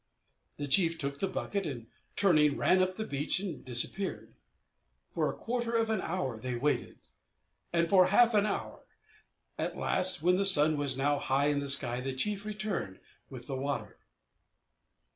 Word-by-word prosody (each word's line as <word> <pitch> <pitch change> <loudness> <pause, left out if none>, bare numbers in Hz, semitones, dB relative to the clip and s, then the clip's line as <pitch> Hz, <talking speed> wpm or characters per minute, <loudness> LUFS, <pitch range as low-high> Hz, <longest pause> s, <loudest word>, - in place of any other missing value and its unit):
The 145 - -4
chief 165 +4 +2
took 140 -1 -4
the 195 - -1
bucket, 195 0 -4
and, 120 -6 -7 0.3
turning, 155 -7 +3
ran 185 - +2
up 185 0 -1
the 220 - -5
beach 145 +2 -2
and 190 -5 -6
disappeared. 130 +10 +1 0.8
For - - -1
a - - -12
quarter 235 0 -3
of 225 -1 +1
an 215 -4 -1
hour 160 -10 -4
they 125 +2 -4
waited; 145 +5 -2 0.7
and 170 0 +1
for 185 0 +4
half 230 +4 +4
an 210 0 +2
hour. 200 - -5 0.8
At - - -3
last, 185 -4 +1
when 180 +1 +3
the 200 - +1
sun 155 -5 +7
was 140 -3 -2
now 145 +1 0
high 140 +1 0
in 145 -1 0
the 140 -1 -4
sky, 125 -3 +2
the 135 +1 -4
chief 200 +9 -2
returned 205 - -5 0.3
with 125 -3 -10
the 135 - -5
water. 140 +2 -5
160 Hz, 170 wpm, -30 LUFS, 140-195 Hz, 0.8 s, sun